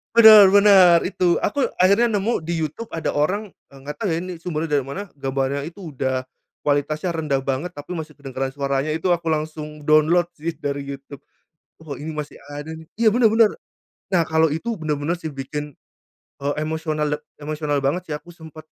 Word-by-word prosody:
Bener 215 Hz, -4 st, +9 dB
bener, 195 Hz, -4 st, +7 dB
itu 180 Hz, -2 st, +1 dB
aku 270 Hz, +6 st, 0 dB
akhirnya 200 Hz, +6 st, +4 dB
nemu 205 Hz, -4 st, -1 dB
di 165 Hz, 0 st, -2 dB
YouTube 160 Hz, +9 st, -5 dB
ada 160 Hz, -, -3 dB
orang, 190 Hz, +9 st, 0 dB, 0.2 s
eee, 135 Hz, -, -14 dB
gak 150 Hz, -, -4 dB
tau 205 Hz, -6 st, -2 dB
ya 165 Hz, -, 0 dB
ini 180 Hz, +1 st, -6 dB
sumbernya 160 Hz, -3 st, -1 dB
dari 140 Hz, -, +1 dB
mana 185 Hz, +10 st, -6 dB
gambarnya 135 Hz, 0 st, -2 dB
itu 170 Hz, +3 st, -8 dB
udah, 130 Hz, -1 st, -2 dB, 0.4 s
kualitasnya 155 Hz, +4 st, 0 dB
rendah 150 Hz, -4 st, 0 dB
banget 135 Hz, +5 st, -3 dB
tapi 160 Hz, +2 st, -8 dB
masih 160 Hz, -1 st, -6 dB
kedengeran 135 Hz, -1 st, -4 dB
suaranya 140 Hz, +1 st, -1 dB
itu 160 Hz, +4 st, -2 dB
aku 170 Hz, -2 st, +1 dB
langsung 155 Hz, -1 st, -4 dB
download 155 Hz, +3 st, +4 dB
sih 165 Hz, +2 st, -3 dB
dari 140 Hz, -1 st, -3 dB
YouTube, 140 Hz, 0 st, -9 dB, 0.6 s
oh, 145 Hz, -4 st, -7 dB
ini 155 Hz, +2 st, -6 dB
masih 150 Hz, -1 st, -6 dB, 0.2 s
ada 145 Hz, +2 st, -7 dB
nih 160 Hz, -, -12 dB
iya, 225 Hz, 0 st, +3 dB
bener 240 Hz, +2 st, +2 dB
bener, 225 Hz, -1 st, +6 dB, 0.6 s
nah 175 Hz, -, +4 dB
kalo 160 Hz, -1 st, +3 dB
itu 225 Hz, +8 st, -3 dB
bener-bener 155 Hz, +1 st, -2 dB
sih 160 Hz, -3 st, -6 dB
bikin, 145 Hz, +2 st, -5 dB, 0.7 s
eee, 140 Hz, +1 st, -2 dB
emosional 155 Hz, -1 st, -2 dB, 0.2 s
emosional 150 Hz, -1 st, -2 dB
banget 165 Hz, +7 st, -1 dB
sih 150 Hz, -, -4 dB
aku, 155 Hz, +4 st, -9 dB
sempet 160 Hz, -2 st, -12 dB
155 Hz, 180 wpm, -22 LUFS, 145-180 Hz, 0.7 s, Bener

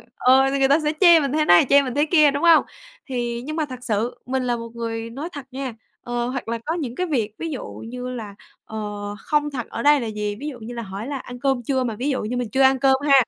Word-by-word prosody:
ờ, 265 Hz, +1 st, +4 dB
thì 275 Hz, -, 0 dB
người 270 Hz, -, +4 dB
ta 285 Hz, +3 st, +4 dB
sẽ 300 Hz, -1 st, 0 dB
chê 345 Hz, -3 st, +8 dB
mình 280 Hz, -3 st, -1 dB
thế 305 Hz, +1 st, +1 dB
này, 175 Hz, -1 st, +6 dB
chê 280 Hz, 0 st, +7 dB
mình 260 Hz, -3 st, -4 dB
thế 290 Hz, +1 st, +3 dB
kia, 305 Hz, -2 st, +5 dB
đúng 285 Hz, +3 st, -3 dB
hông? 335 Hz, -2 st, +7 dB, 0.5 s
Thì 240 Hz, -2 st, -2 dB
nhưng 310 Hz, +2 st, -4 dB
mà 315 Hz, -1 st, 0 dB
thật 255 Hz, -3 st, -8 dB
sự 225 Hz, +1 st, -2 dB
mình 260 Hz, 0 st, -1 dB
là 245 Hz, -1 st, 0 dB
một 230 Hz, 0 st, -7 dB
người 230 Hz, -1 st, -4 dB
nói 280 Hz, +8 st, -6 dB
thật 285 Hz, -6 st, -8 dB
nha, 260 Hz, -2 st, -4 dB, 0.3 s
ờ, 240 Hz, 0 st, -2 dB
hoặc 255 Hz, -1 st, -4 dB
là 230 Hz, +1 st, -1 dB
có 320 Hz, -, -1 dB
những 270 Hz, -8 st, -4 dB
cái 365 Hz, +4 st, -1 dB
việc 235 Hz, -9 st, -1 dB
ví 330 Hz, -, -4 dB
dụ 275 Hz, -, -5 dB, 0.2 s
như 250 Hz, +1 st, -6 dB
là, 220 Hz, -5 st, -7 dB, 0.3 s
ờ, 220 Hz, -, -6 dB, 0.4 s
không 295 Hz, +3 st, 0 dB
thật 250 Hz, -4 st, -4 dB
ở 230 Hz, -, -5 dB
đây 290 Hz, 0 st, +6 dB
là 235 Hz, -, -3 dB
gì, 210 Hz, -1 st, -3 dB
ví 290 Hz, -, -5 dB
dụ 265 Hz, -5 st, -6 dB
như 235 Hz, +2 st, -8 dB
là 235 Hz, -, -5 dB
hỏi 200 Hz, +2 st, -6 dB
là 280 Hz, -1 st, -3 dB
ăn 245 Hz, -1 st, -9 dB
cơm 265 Hz, -2 st, 0 dB
chưa 260 Hz, +1 st, 0 dB
mà 230 Hz, -3 st, -3 dB
ví 255 Hz, +7 st, -2 dB
dụ 265 Hz, -, -1 dB
như 245 Hz, +4 st, -3 dB
mình 240 Hz, -3 st, -2 dB
chưa 265 Hz, +5 st, +1 dB
ăn 265 Hz, 0 st, +5 dB
cơm 270 Hz, 0 st, +4 dB
ha, 280 Hz, -, +5 dB
260 Hz, 285 wpm, -22 LUFS, 235-285 Hz, 0.5 s, chê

